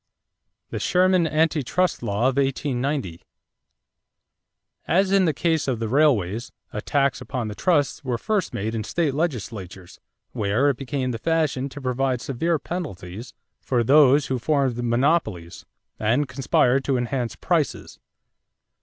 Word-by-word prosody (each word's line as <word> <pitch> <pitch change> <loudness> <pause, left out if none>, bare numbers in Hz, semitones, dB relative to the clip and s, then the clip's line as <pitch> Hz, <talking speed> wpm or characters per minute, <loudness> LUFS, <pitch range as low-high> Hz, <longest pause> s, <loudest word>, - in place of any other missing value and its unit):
=The - - -3
Sherman 185 -2 +3
Anti 155 0 +1
Trust 180 +8 0
Law 115 +1 0
of 135 - +2
1890.= 135 - -1 1.7
As 190 +3 +2
in 195 -1 +4
the 160 - +3
case 160 +1 0
of 130 -3 0
the 115 0 -3
railways, 115 - +1 0.2
attacks 135 +5 0
upon 125 -5 -4
the - - -5
trusts 145 - +1
were 125 -3 -1
first 205 - -1
made 110 +3 -3
in 110 -2 -2
state 160 0 -1
legislatures, 110 - -4 0.3
where 110 +8 +1
it 130 - -7
became 135 -1 -2
the 115 - -4
fashion 155 -4 0
to 145 - -9
provide 130 0 0
severe 160 +7 -1
penalties 120 - -7 0.3
for 120 -3 0
those 140 +2 +5
who 130 -1 -2
formed 135 -2 +1
monopolies 120 - 0 0.3
and 120 +7 +1
"conspired 130 0 +2
to 135 -2 +1
enhance 120 -1 -2
prices." - - -2
135 Hz, 135 wpm, -23 LUFS, 115-150 Hz, 1.7 s, those